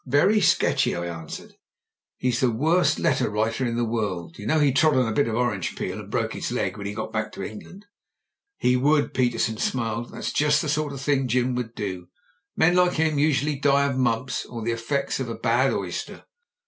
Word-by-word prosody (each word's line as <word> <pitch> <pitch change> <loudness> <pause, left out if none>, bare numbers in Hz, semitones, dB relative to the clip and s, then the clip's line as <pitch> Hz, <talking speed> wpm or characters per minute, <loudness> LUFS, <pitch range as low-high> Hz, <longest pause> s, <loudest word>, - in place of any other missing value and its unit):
Very 195 - +4
sketchy," - - +2
I 85 - -3
answered. 80 -2 -7 0.6
"He's 125 -1 0
the 130 - +3
worst 155 +6 +2
let - - +1
ter - - 0
writer 110 +4 0
in 115 0 -2
the 120 - +1
world. 100 -8 -3
You 105 - -6
know 160 - +2
he 145 -2 +4
trod 150 +2 +4
on 130 -2 +3
a - - -1
bit 140 +4 +2
of 110 - -2
orange 120 -7 -1
peel - - -4
and - - -10
broke - - -1
his - - -4
leg - - -1
when 100 -1 -6
he 100 - -5
got - - -5
back 110 -1 -2
to - - -6
England." 180 - -9 0.7
"He 125 - +2
would." 145 +4 +2
Petersen 120 -3 0
smiled. 115 -1 -2
"That's - - -4
just 150 +1 +3
the 155 - -2
sort 150 0 0
of 135 - -7
thing 135 -2 +1
Jim 125 +1 +1
would 120 -2 -4
do. 95 -3 -5 0.5
Men 175 +2 +4
like 180 0 +4
him 155 -2 +1
usually 150 -1 +1
die 140 0 +3
of 140 -2 -1
mumps, 130 0 0
or 115 -2 -7
the 115 - 0
effects 140 +5 -2
of 130 -3 -3
a 115 - -4
bad 125 +3 +2
oyster." - - -5
125 Hz, 215 wpm, -24 LUFS, 115-145 Hz, 0.7 s, Very